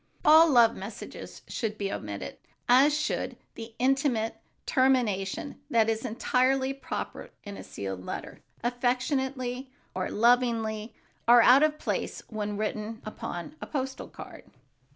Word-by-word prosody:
All 320 +2 +8
love 235 -4 +5
messages 200 +4 -9
should 215 -3 -3
be 200 -1 -2
omitted, 100 -1 -6 0.3
as 265 +4 +6
should 305 - -2 0.2
the 225 0 -9
intimate 255 -4 +1 0.3
termination 255 -4 +1
that 225 -4 +3
is 220 0 -3
entirely 260 +3 +1
proper 275 - -6
in 205 -1 -8
a - - -8
sealed 95 -2 -6
letter. - - -7 0.2
"Affectionately" 255 +1 -1 0.2
or 185 0 -2
"Lovingly" 230 -2 +1 0.3
are 240 0 +8
out 255 +3 +7
of 305 0 +3
place - - -3
when 210 -2 -3
written 215 +1 -3
upon 215 - -6
a - - -6
postal 265 -2 -4
card. - - -11
240 Hz, 130 wpm, -28 LUFS, 215-265 Hz, 0.3 s, All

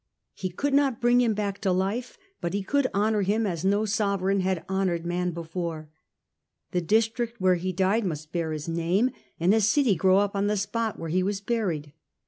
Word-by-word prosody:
He 185 - -4
could 280 +11 -2
not 275 -4 +3
bring 240 +1 +4
him 230 -3 +2
back 205 -1 -2
to 195 -3 +1
life, 195 +7 -1 0.2
but 170 +1 -2
he 200 - -1
could 280 +6 +1
honour 210 +1 +1
him 210 +3 +1
as 170 -4 -2
no 200 +3 +2
sovereign 200 -2 +1
had 185 -3 -1
honoured 190 -3 -1
man 180 +1 -1
before. 165 -2 -5 0.8
The 180 - 0
district 225 +5 0
where 185 -1 +4
he 180 +1 -1
died 190 +5 +1
must 155 -4 -4
bear 170 -2 -2
his 155 0 -5
name, 170 +9 +1 0.3
and 175 +4 +4
a 220 - +3
city 220 +3 +3
grow 185 +2 +3 0.2
on 200 0 0
the 210 0 +1
spot 220 +2 -2
where 165 - -5
he 185 +3 +1
was 195 +1 -1
buried. 190 -10 -2
195 Hz, 195 wpm, -26 LUFS, 175-220 Hz, 0.8 s, bring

